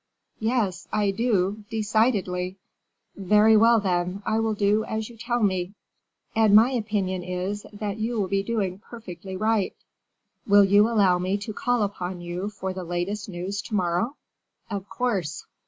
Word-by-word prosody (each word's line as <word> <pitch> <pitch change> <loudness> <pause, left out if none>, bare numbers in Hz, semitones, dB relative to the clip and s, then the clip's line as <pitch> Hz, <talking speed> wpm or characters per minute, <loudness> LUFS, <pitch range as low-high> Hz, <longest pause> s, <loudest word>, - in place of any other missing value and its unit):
"Yes, 215 -6 -1
I 205 -2 +1
do, 205 -2 0
decidedly." 205 -4 0 0.6
"Very 210 +3 +4
well, 230 +1 +6
then, 180 0 -1
I 220 +1 +1
will 225 -1 0
do 205 +1 +2
as 220 0 -3
you - - -14
tell 235 +1 -1
me." 185 0 0 0.6
"And 220 -2 +5
my 225 +5 +7
opinion 210 -6 -1
is, 180 +3 -4
that 205 -1 -4
you 225 +1 -2
will 195 - 0
be 195 +1 +1
doing 195 -3 -2
perfectly 190 -5 -9
right. 215 -1 +1 0.7
Will 205 0 +7
you 205 +3 +5
allow 195 -6 +3
me 185 +2 0
to 205 +2 -6
call 245 +1 +1
upon 185 -3 -4
you 175 +3 -4
for 190 -2 -5
the 185 -1 -5
latest 175 +4 -3
news 190 +3 -4
to 215 - -5
morrow?" 180 +8 0 0.6
"Of 200 -1 -4
course." 195 - -2
205 Hz, 155 wpm, -25 LUFS, 185-220 Hz, 0.7 s, my